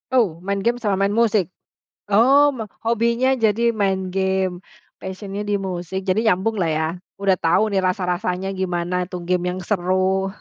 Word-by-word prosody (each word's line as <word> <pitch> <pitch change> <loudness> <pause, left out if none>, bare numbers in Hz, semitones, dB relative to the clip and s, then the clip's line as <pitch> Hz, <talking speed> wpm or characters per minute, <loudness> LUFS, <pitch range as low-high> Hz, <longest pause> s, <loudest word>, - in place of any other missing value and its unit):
Oh, 195 -10 +1
main 200 +1 -1
game 235 +5 +1
sama 210 -5 -1
main 200 +1 +1
musik? 220 -6 +2 0.6
Oh, 270 +8 +5
me 245 -5 -5 0.2
hobinya 235 +3 +2
jadi 225 +2 +3
main 190 -4 -1
game, 190 -1 0 0.4
passion-nya 195 +2 -6
di 205 - +1
musik, 190 0 -4
jadi 185 +3 +2
nyambung 200 +5 0
lah 170 - +1
ya? 155 +1 0 0.4
Udah 195 -1 +3
tahu 190 +6 +2
nih 195 - +2
rasa-rasanya 185 0 -1
gimana 180 0 -1
itu 185 - -8
game 180 0 +1
yang - - -5
seru. 190 0 +1
190 Hz, 160 wpm, -21 LUFS, 185-220 Hz, 0.6 s, Oh